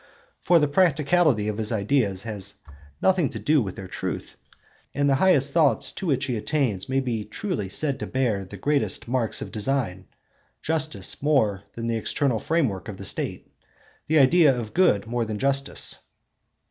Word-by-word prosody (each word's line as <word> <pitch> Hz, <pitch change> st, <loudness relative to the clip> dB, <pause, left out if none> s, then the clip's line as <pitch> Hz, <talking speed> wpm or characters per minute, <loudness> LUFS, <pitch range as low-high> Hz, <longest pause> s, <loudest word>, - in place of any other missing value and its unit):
For 175 Hz, -, +4 dB
the 150 Hz, -2 st, +3 dB
practicability 150 Hz, -, +3 dB
of 105 Hz, 0 st, -3 dB
his 110 Hz, 0 st, -2 dB
ideas 105 Hz, -3 st, +1 dB
has 105 Hz, -3 st, -4 dB, 0.5 s
nothing 185 Hz, -6 st, +3 dB
to -, -, -6 dB
do 150 Hz, -2 st, +2 dB
with 95 Hz, -5 st, -4 dB
their 95 Hz, -, -8 dB
truth; -, -, -5 dB, 0.6 s
and 145 Hz, +1 st, +2 dB
the 140 Hz, -, +4 dB
highest 145 Hz, -7 st, +4 dB
thoughts 145 Hz, -9 st, +2 dB
to 190 Hz, -, -6 dB
which 135 Hz, -3 st, +1 dB
he 125 Hz, -3 st, -2 dB
attains 110 Hz, -5 st, -1 dB
may 135 Hz, 0 st, +2 dB
be 120 Hz, -5 st, -2 dB
truly 110 Hz, -, -4 dB
said 140 Hz, +6 st, -1 dB
to -, -, -4 dB
bear 120 Hz, -7 st, 0 dB
the 95 Hz, +2 st, -10 dB
greatest 145 Hz, +6 st, -1 dB
'marks 120 Hz, -2 st, -1 dB
of -, -, -9 dB
design'—justice 135 Hz, -, -3 dB
more 110 Hz, -10 st, +1 dB
than 115 Hz, -, -5 dB
the 115 Hz, -1 st, 0 dB
external 120 Hz, +1 st, 0 dB
frame 165 Hz, +1 st, +1 dB
work 95 Hz, -4 st, -6 dB
of -, -, -7 dB
the -, -, -8 dB
State, -, -, -3 dB, 0.6 s
the 160 Hz, -, +3 dB
idea 140 Hz, -1 st, +5 dB
of 110 Hz, -2 st, -6 dB
good 175 Hz, -, +3 dB
more 120 Hz, +1 st, -1 dB
than 110 Hz, -1 st, -4 dB
justice. 135 Hz, +3 st, -1 dB
130 Hz, 170 wpm, -25 LUFS, 105-150 Hz, 0.6 s, idea